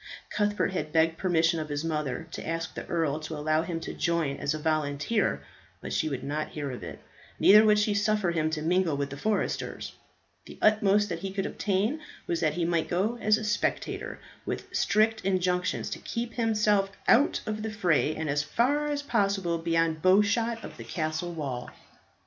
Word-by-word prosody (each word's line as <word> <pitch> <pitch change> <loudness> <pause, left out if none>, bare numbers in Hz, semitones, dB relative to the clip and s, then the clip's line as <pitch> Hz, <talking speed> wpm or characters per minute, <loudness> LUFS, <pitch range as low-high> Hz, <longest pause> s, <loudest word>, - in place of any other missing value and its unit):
Cuthbert 205 -2 0
had 155 -4 -3
begged 165 +1 +2
permission 170 -2 +2
of 155 -1 -5
his 145 +1 -2
mother 150 -3 -2
to - - -6
ask 165 0 -3
the - - -7
earl 160 -3 0
to 155 0 -6
allow 155 +1 +1
him 165 0 -3
to - - -5
join 170 -5 0
as 145 - -1
a - - -3
volunteer, 155 +6 0 0.4
but - - -6
she 155 - +1
would 135 -3 -4
not 150 +2 -2
hear 145 -3 -4
of 125 - -7
it. - - -7 0.4
Neither 210 +2 +8
would 210 -1 +5
she 210 0 +2
suffer 205 -3 +1
him 155 -2 0
to 155 -1 -3
mingle 170 -2 +2
with 140 -1 -2
the - - -5
foresters. 210 +8 -2 0.5
The - - -11
utmost 210 -1 +4
that 170 -2 -3
he 195 +1 -4
could 195 0 -2
obtain 210 +9 0 0.3
was 170 - -1
that 155 -2 +1
he 175 -1 0
might 170 -1 0
go 210 +7 0
as 215 0 +4
a 220 - -5
spectator, 210 -1 -2 0.2
with - - -5
strict 220 +1 +2
injunctions 180 -1 0
to - - -4
keep 235 0 -4
himself 210 -4 +2 0.2
out 270 +5 +4
of 215 0 -3
the 220 - -3
fray, 175 -7 +1
and 160 0 -3
as 145 0 +1
far 285 - +1
as 290 -1 -2
possible 195 -9 0
beyond 165 -1 +1
bow 185 +4 +6
shot 225 +2 0
of - - -9
the - - -8
castle 160 +1 -3
wall. 130 -6 -4
175 Hz, 195 wpm, -28 LUFS, 155-210 Hz, 0.5 s, Neither